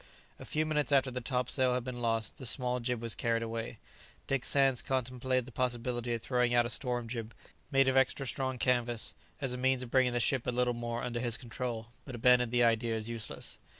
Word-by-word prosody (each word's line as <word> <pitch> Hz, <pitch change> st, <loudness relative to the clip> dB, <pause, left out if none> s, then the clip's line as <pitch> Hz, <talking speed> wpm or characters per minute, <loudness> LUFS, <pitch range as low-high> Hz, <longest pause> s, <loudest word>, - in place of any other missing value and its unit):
A -, -, -9 dB
few 155 Hz, +1 st, 0 dB
minutes 150 Hz, -2 st, 0 dB
after 135 Hz, -2 st, +4 dB
the 125 Hz, 0 st, -4 dB
topsail 125 Hz, +1 st, +1 dB
had 125 Hz, -, -1 dB
been 125 Hz, -1 st, -5 dB
lost, 115 Hz, -2 st, 0 dB
the 130 Hz, -, -5 dB
small 125 Hz, +1 st, +1 dB
jib 120 Hz, -1 st, -2 dB
was 115 Hz, -2 st, +2 dB
carried 115 Hz, 0 st, 0 dB
away. 115 Hz, 0 st, -4 dB, 0.5 s
Dick 135 Hz, -2 st, -1 dB
Sands 135 Hz, -3 st, +4 dB
contemplated 130 Hz, -1 st, -1 dB
the 130 Hz, -, -11 dB
possibility 120 Hz, 0 st, -1 dB
of 115 Hz, -, -7 dB
throwing 125 Hz, -1 st, +2 dB
out 120 Hz, 0 st, +5 dB
a -, -, -2 dB
storm 120 Hz, -1 st, -2 dB
jib, 115 Hz, -1 st, -5 dB, 0.3 s
made 135 Hz, -2 st, +4 dB
of 130 Hz, -, +2 dB
extra 135 Hz, +1 st, +2 dB
strong 130 Hz, 0 st, -2 dB
canvas, 120 Hz, -2 st, 0 dB, 0.3 s
as 135 Hz, -3 st, -1 dB
a -, -, -3 dB
means 130 Hz, 0 st, +2 dB
of 120 Hz, -, -9 dB
bringing 130 Hz, -2 st, +3 dB
the 120 Hz, -, +1 dB
ship 125 Hz, +1 st, 0 dB
a -, -, +2 dB
little 125 Hz, 0 st, +1 dB
more 120 Hz, 0 st, -3 dB
under 120 Hz, -1 st, -2 dB
his 120 Hz, -2 st, -2 dB
control, 120 Hz, -1 st, -5 dB
but 130 Hz, -, -7 dB
abandoned 125 Hz, 0 st, +4 dB
the 120 Hz, 0 st, +3 dB
idea 115 Hz, 0 st, +2 dB
as 110 Hz, +1 st, -3 dB
useless. 115 Hz, -2 st, -5 dB
125 Hz, 215 wpm, -32 LUFS, 115-130 Hz, 0.5 s, out